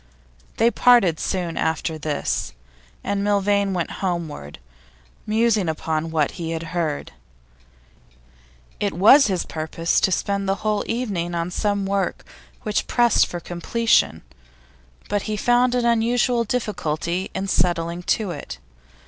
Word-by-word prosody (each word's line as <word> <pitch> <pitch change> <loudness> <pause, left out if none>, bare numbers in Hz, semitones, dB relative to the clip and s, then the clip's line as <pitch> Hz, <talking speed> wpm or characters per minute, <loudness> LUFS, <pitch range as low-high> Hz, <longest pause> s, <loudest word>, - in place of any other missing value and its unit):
They 230 +1 +4
parted 235 -12 +4
soon 175 -4 -2
after 160 0 -1
this, 145 - -2 0.5
and 200 0 -1
Milvain 200 -1 +2
went 175 -3 -2
homeward, 165 - -4 0.7
musing 215 -4 +2
upon 160 0 -2
what 155 -3 +1
he 165 -2 -5
had 165 0 -4
heard. 160 -4 -2 1.7
It - - -1
was 225 - +7
his 185 -4 -1
purpose 160 +1 -1
to 190 - +2
spend 200 +1 -1
the 195 - +2
whole 210 -1 +1
evening 195 -8 -2
on 170 +1 -2
some 205 +1 -1
work 195 0 -2 0.4
which 215 -3 -1
pressed 240 -2 +3
for 175 - -5
completion, 175 - +1 0.8
but 205 0 0
he 215 - -1
found 245 +3 +3
an 245 -1 +1
unusual 235 +1 +2
difficulty 180 -6 -2
in 195 +1 -2
settling 170 -1 0
to 200 +2 0
it. 145 - -7
190 Hz, 130 wpm, -22 LUFS, 165-215 Hz, 1.7 s, was